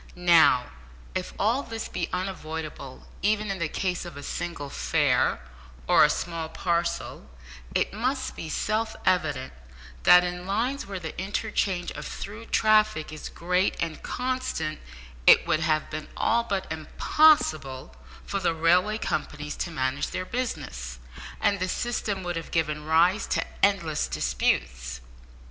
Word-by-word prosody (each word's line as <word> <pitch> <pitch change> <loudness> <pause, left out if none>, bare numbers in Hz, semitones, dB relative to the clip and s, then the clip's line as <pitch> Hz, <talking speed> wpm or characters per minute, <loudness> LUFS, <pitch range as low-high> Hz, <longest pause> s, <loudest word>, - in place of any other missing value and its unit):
Now, 170 -8 +5 0.4
if 185 - -3
all 230 +6 +2
this 225 -4 -5
be - - -3
unavoidable 160 -7 -5 0.2
even 210 +1 +1
in 195 - -4
the 170 - 0
case 180 0 -2
of 170 -5 -9
a 145 - -8
single 145 -1 -4
fare, - - +2 0.5
or - - +7
a - - +6
small 165 -2 -3
parcel, 170 -1 -2 0.5
it - - +1
must 255 +5 -1
be 160 - -6
self 220 +6 -1
evident 150 -8 +1 0.5
that 180 0 +8
in 180 0 -4
lines 235 +6 -1
where 195 -1 -4
the 160 -3 -6
interchange 190 -2 -1
of - - -6
through 215 +3 -7
traffic 215 -8 +3
is 155 - -7
great 180 +3 0
and 165 -2 -3
constant, 250 -12 -2 0.5
it - - +8
would 155 - +2
have 155 -2 +1
been 155 0 -5
all 235 +1 +2
but 195 -4 -1
impossible 155 - +2 0.3
for 200 - -2
the 175 -3 +1
railway 180 +6 +3
companies 150 -6 -3
to - - -2
manage 135 -3 -1
their 185 - -4
business, 65 - -4 0.4
and 200 -1 +2
the 185 +1 -1
system 210 -3 -2
would 175 -1 -3
have 165 - -6
given 150 -2 -1
rise 175 +6 +3
to - - 0 0.2
endless 170 -7 +2
disputes. - - -1
175 Hz, 145 wpm, -26 LUFS, 155-205 Hz, 0.5 s, that